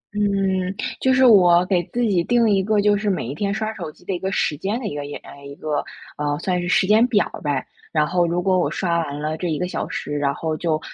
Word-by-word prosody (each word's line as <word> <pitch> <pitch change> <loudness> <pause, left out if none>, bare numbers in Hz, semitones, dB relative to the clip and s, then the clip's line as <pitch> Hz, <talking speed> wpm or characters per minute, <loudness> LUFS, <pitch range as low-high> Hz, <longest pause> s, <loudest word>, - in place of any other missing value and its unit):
嗯， 195 -2 0 0.3
就 260 - +3
是 260 0 +5
我 180 -6 +6
给 180 -2 +1
自 245 - -3
己 195 -7 +2
定 240 +1 +3
一 195 -1 +2
个 210 +1 +1
就 205 0 +3
是 205 0 -1
每 185 - -1
一 130 - -4
天 200 +6 -2
刷 215 +1 -2
手 170 -7 -6
机 175 - -23
的 195 - -2
一 175 - -3
个 190 +1 -3
时 150 - 0
间 200 - -2
的 240 - -7
一 195 - -3
个 145 - -3
诶， 140 0 -9
一 140 - -9
个， 150 -1 -2 0.3
嗯， 145 0 -1
算 180 0 -1
是 175 - -4
时 185 - +3
间 215 +4 +5
表 215 -5 +2 0.2
呗。 145 -2 -1 0.3
然 150 -2 +2
后 175 +1 +2
如 170 +1 0
果 185 0 +2
我 - - +1
刷 170 -3 0
完 145 -3 -4
了 155 +1 -2
这 180 - -3
1 155 - -1
个 180 - -2
小 - - -4
时， 145 - -5
然 140 -1 +1
后 160 -1 -2
就， 155 -1 0
180 Hz, 280 characters per minute, -22 LUFS, 155-205 Hz, 0.3 s, 我